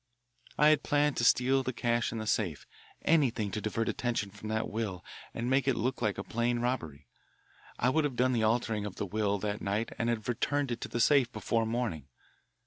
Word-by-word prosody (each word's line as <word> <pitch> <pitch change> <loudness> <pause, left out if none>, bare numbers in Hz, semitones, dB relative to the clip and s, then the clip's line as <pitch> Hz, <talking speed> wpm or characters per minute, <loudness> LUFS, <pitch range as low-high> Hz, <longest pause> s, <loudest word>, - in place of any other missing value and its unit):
"I 150 +1 +6
had 155 -2 +4
planned 145 -1 +1
to - - 0
steal 130 +3 +4
the 130 0 -3
cash 120 0 0
in 115 - -4
the 110 - -4
safe, 95 -8 -1 0.4
anything 125 -10 +2
to 105 - -3
divert 110 +2 -1
attention 115 -5 -1
from 105 +2 -8
the 110 0 0
will 105 -5 -4 0.3
and 115 +1 -4
make 135 0 +2
it 135 - +3
look 125 +2 -2
like 105 -4 0
a 100 - -3
plain 120 +2 0
robbery. 80 - -3 0.7
I 125 - +2
would 155 +4 +2
have 140 -4 -2
done 130 +1 +2
the 115 - +1
altering 110 -2 +1
of 100 - -8
the - - -3
will 100 +1 0
that 105 +1 -3
night 105 +3 -2
and 115 - +1
have 110 -2 -2
returned 135 +3 0
it 120 - -3
to - - -3
the 120 - -3
safe 130 -1 +4
before 115 -3 -1
morning. 110 - -2
115 Hz, 215 wpm, -30 LUFS, 105-125 Hz, 0.7 s, I